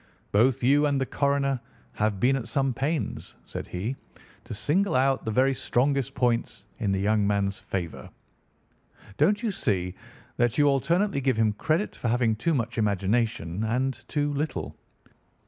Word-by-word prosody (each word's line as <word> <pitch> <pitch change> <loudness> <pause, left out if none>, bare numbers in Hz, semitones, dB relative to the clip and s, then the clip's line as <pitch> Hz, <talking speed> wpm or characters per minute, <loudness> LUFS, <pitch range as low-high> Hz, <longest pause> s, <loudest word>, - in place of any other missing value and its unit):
"Both 120 +4 +3
you 145 +4 +4
and 140 -1 +1
the 135 - 0
coroner 140 -1 0 0.3
have 105 -2 0
been 130 +5 +3
at 125 -4 -4
some 135 +3 0
pains," 140 -2 -3
said - - -6
he, 105 +9 -3 0.5
"to - - -12
single 180 - +1
out 135 +1 +2
the - - -1
very 130 +5 +3
strongest 135 +1 0
points 120 -5 0
in 105 -4 0
the 95 - +1
young 105 +1 +2
man's 100 -1 0
favour. 95 -4 -5 1.1
Don't 205 +3 +3
you 225 - +1
see 90 - -1 0.4
that 120 -2 +1
you 145 - +5
alternately 145 +5 +2
give 130 -3 +1
him 110 -2 +3
credit 160 - -1
for - - -4
having 115 -1 +2
too 160 +9 0
much 115 -2 -2
imagination 105 -2 0
and 125 +4 -1
too 145 -1 -1
little? 150 +2 -3
125 Hz, 160 wpm, -26 LUFS, 105-140 Hz, 1.1 s, you